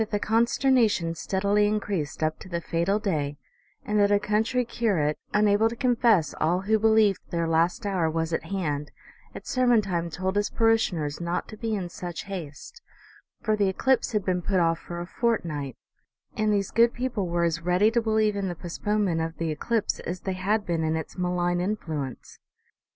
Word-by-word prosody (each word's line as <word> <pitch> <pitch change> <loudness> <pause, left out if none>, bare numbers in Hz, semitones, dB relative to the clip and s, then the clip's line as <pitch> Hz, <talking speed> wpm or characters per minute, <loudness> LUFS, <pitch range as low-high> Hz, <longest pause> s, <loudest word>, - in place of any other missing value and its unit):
the 205 - 0
consternation 225 -5 +2
steadily 200 +4 +1
increased 200 -8 -2
up 155 0 0
to 190 - -11
the 170 -1 -2
fatal 170 +4 0
day, 150 -9 -2 0.5
and 210 0 +1
that 205 0 +4
a 205 - +4
country 220 +4 0
curate, 185 -11 0 0.2
unable 210 +1 +3
to 235 - -6
confess 235 - +2
all 175 +4 +2
who 215 +3 +2
be 220 - +3
lieved 220 -3 +4
their 170 -1 -1
last 170 +7 +1
hour 185 -5 +1
was 160 +1 -2
at - - -2
hand, 150 -7 -2 0.5
at - - -8
sermon 245 -2 +3
time 175 -5 -2
told 185 +4 -3
his 205 0 +1
parishioners 180 -10 +1
not 170 +1 -2
to 215 - -9
be 220 0 -2
in 190 -3 -3
such 175 0 -6
haste, 190 - -8 0.6
for 215 -1 +2
the 200 -2 +2
eclipse 260 +8 +1
had 210 -4 -1
been 180 -1 0
put 190 +1 +1
off 165 -1 +2
for 170 0 -7
a 175 - -4
fortnight; 165 - -2 0.6
and 215 0 +1
these 200 -1 0
good 235 +1 +4
people 240 -6 -2
were 170 0 0
as 165 -1 0
ready 180 +5 +3
to 235 0 +2
believe 220 -2 +1
in 200 -1 -2
the 175 - -3
postponement 185 0 -1
of 165 0 -4
the 165 -1 -1
eclipse 215 +8 -1
as 175 0 -5
they 190 - -2
had 200 +3 0
been 165 -2 -1
in 160 0 0
its 160 -2 -5
malign 175 -1 0
influence. 160 - -4
190 Hz, 190 wpm, -26 LUFS, 170-215 Hz, 0.6 s, that